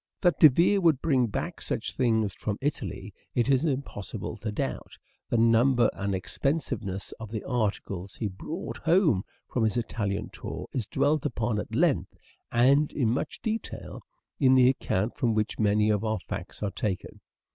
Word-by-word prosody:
That 175 -2 +3
De 155 - +10
Vere 175 +8 +3
would 160 -6 +4
bring 130 -7 +2
back 105 - -4
such - - -3
things 110 -5 +1
from 105 -1 -3
Italy 110 -8 -3 0.2
it 120 +2 +2
is 135 0 +3
impossible 135 - -3
to 110 - -4
doubt. 105 - -4 0.3
The 120 - +1
number 115 +1 +4
and 100 0 -2
expensiveness 100 - -2
of 110 -2 -7
the 110 -1 -4
articles 100 -5 -2
he 110 - -2
brought 100 - -6
home 165 - +3 0.3
from 120 - -1
his 110 +1 +1
Italian 105 -3 -2
tour - - -6
is 120 -6 -2
dwelt 150 0 +1
upon 115 -6 -1
at - - -5
length, - - +1 0.3
and 135 +5 +4
in 120 -6 +1
much 125 - -3
detail, 225 0 -4 0.4
in 130 -2 +5
the 130 -1 +7
account 115 -5 -1
from 115 -3 +1
which 110 0 -1
many 105 0 +3
of 105 0 0
our 110 0 0
facts - - -7
are 100 - -1
taken. 95 -1 -4
115 Hz, 170 wpm, -28 LUFS, 105-135 Hz, 0.4 s, De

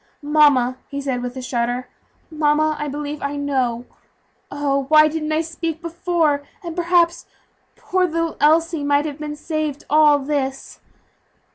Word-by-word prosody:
"Mamma," 290 -4 +3
he 280 - -4
said 265 -3 -2
with 245 +1 -5
a 260 - -5
shudder, 245 0 -2 0.4
"mamma, 310 0 +2
I 295 - -3
believe 290 +1 -5
I 280 +1 -3
know. 260 -4 -1 0.6
Oh! 275 -1 -1
why 305 0 +7
didn't 310 0 -3
I 310 +1 +2
speak 330 0 -4
before, 335 -3 0 0.2
and, 335 -2 -6
perhaps, 345 -1 +2 0.5
poor 425 -6 0
little 330 -1 -2
Elsie 325 +1 +3
might 285 +1 +2
have 295 -1 -5
been 300 -1 -5
saved 305 -1 -3
all 300 -1 +6
this." 270 -1 -3
300 Hz, 145 wpm, -21 LUFS, 280-320 Hz, 0.6 s, why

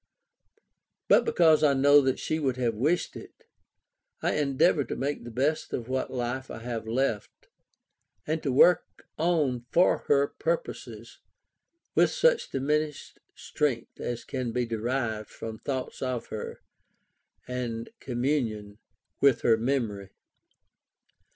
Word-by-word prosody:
But - - +5
because 160 - +4
I 140 -2 +4
know 145 +2 +6
that 130 -1 0
she 155 - -2
would 130 -4 -1
have 120 -2 0
wished 150 +11 0
it, - - -12 0.8
I - - +1
endeavour 145 +2 +2
to - - -4
make 140 +1 -3
the 120 - -8
best 140 +6 -1
of 115 - -3
what 130 0 -2
life 130 +1 -3
I - - -6
have 115 -2 -4
left, 115 -2 -2 0.8
and 155 +1 -1
to 140 - -1
work 160 +6 +3
on 150 -8 +1
for 180 - +4
her 140 -1 +4
purposes - - -4 0.7
with - - +4
such - - +2
diminished 150 +2 -2 0.2
strength 130 -6 -2
as 120 -1 -4
can 130 -3 -3
be 125 +1 0
derived 115 -1 -2
from 110 -1 -7
thoughts 130 +1 -4
of 130 -2 -3
her, 110 - -6 0.8
and 120 - -4
communion 120 -5 -2 0.4
with 140 -3 +4
her 115 - +4
memory. 110 -5 -2
130 Hz, 130 wpm, -28 LUFS, 120-145 Hz, 0.8 s, know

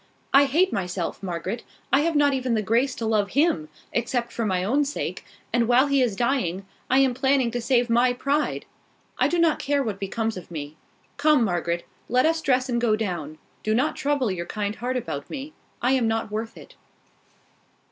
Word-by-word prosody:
"I 275 +1 +7
hate 335 +8 +2
myself, 180 -2 -3
Margaret. 185 +4 -4 0.3
I 270 - +6
have 325 +1 0
not 290 -1 +4
even 255 -3 0
the 215 - 0
grace 240 +6 +1
to 230 - -4
love 215 -2 +1
him, 260 - +2 0.2
except 240 0 -1
for 230 -2 -2
my 185 -2 0
own 270 +9 +2
sake; 285 +1 -4 0.3
and 235 -2 +2
while 245 +3 +5
he 280 -1 +2
is 235 -6 +1
dying, 200 -7 0 0.2
I 260 - +4
am 270 -2 +4
planning 265 -1 +2
to 245 0 -2
save 245 0 +2
my 240 +2 +3
pride! 280 +4 -1 0.5
I - - +4
do 350 - 0
not 335 -2 +3
care 285 0 +1
what 210 -5 -4
becomes 220 +2 -2
of 180 - -9
me. 150 -2 -6 0.4
Come, 295 -3 +4
Margaret, 175 -3 -1 0.2
let 250 +3 +3
us 325 0 +2
dress 255 -2 +2
and 235 -2 0
go 225 -3 +3
down. 175 -8 -4 0.2
Do 215 0 0
not 265 +6 +1
trouble 275 -6 0
your 170 -2 -4
kind 205 -1 -2
heart 250 +2 -2
about 145 - -5
me: 290 +1 -6 0.3
I 250 - +3
am 255 -4 +2
not 225 -1 -1
worth 220 +1 -4
it." - - -13
240 Hz, 200 wpm, -25 LUFS, 205-270 Hz, 0.5 s, I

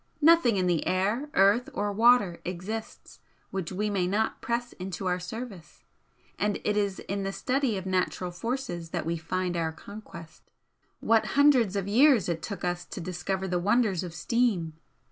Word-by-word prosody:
Nothing 315 -9 +6
in 185 - +1
the 175 -3 +1
air, 205 +10 0
earth 200 +6 +4
or 205 0 -1
water 220 -4 +4
exists 190 +5 -6 0.3
which 190 -3 -3
we 205 +3 -1
may 195 -4 0
not 210 +4 -1
press 240 +1 -2
into 190 0 -6
our 180 0 0
service, 180 - -8 0.6
and 205 +1 0
it 210 - 0
is 200 -2 0
in 200 +1 -3
the 195 0 -2
study 250 +3 0
of 190 - -6
natural 185 -1 -1
forces 175 -4 -4
that - - -3
we 165 +1 -1
find 175 +2 -2
our 165 -1 -1
conquest. 170 -2 -12 0.5
What 225 -1 +3
hundreds 260 -9 +5
of 200 -1 -2
years 245 +1 +5
it 170 -2 -2
took 200 -4 -6
us 175 0 -1
to - - -8
discover 185 +2 -3
the 180 -1 0
wonders 205 -1 +2
of 175 -2 -7
steam! 185 -3 0
195 Hz, 170 wpm, -28 LUFS, 180-225 Hz, 0.6 s, Nothing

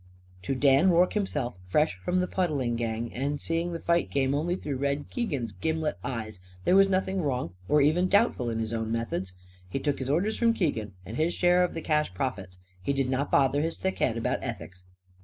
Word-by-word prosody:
To 135 +9 -2
Dan 140 +6 +5
Rorke 180 +1 +4
himself 150 - -1
fresh 150 +9 +2
from 180 - 0
the 180 0 +1
puddling 145 -12 0
gang, 115 0 -3
and 140 +3 -2
seeing 165 +3 -1
the 165 - -4
fight 170 0 +1
game 135 -1 +1
only 165 +5 0
through 145 -7 -4
Red 140 +2 -2
Keegan's 140 - -2
gimlet 155 - -2
eyes 110 -5 -4 0.3
there 185 - +4
was 195 0 +6
nothing 190 0 0
wrong 125 - -2 0.2
or 150 0 +5
even 160 +6 +3
doubtful 200 - +2
in 115 - -2
his 115 0 -2
own 115 -1 -2
methods. 115 -5 -2 0.4
He 95 - -2
took 140 +1 -1
his 130 0 -3
orders 185 +9 +1
from 230 -1 +3
Keegan; 115 - -1
and 110 +5 -6
his 165 +3 +1
share 180 0 +4
of 180 - -2
the 165 - -3
cash 150 - 0
profits. 95 -6 -3 0.2
He 95 - 0
did 135 -2 0
not 135 +2 0
bother 140 +1 +3
his 165 +2 -2
thick 190 0 -2
head 115 -2 +1
about 115 - -1
ethics. 90 0 -7
140 Hz, 210 wpm, -28 LUFS, 115-175 Hz, 0.4 s, was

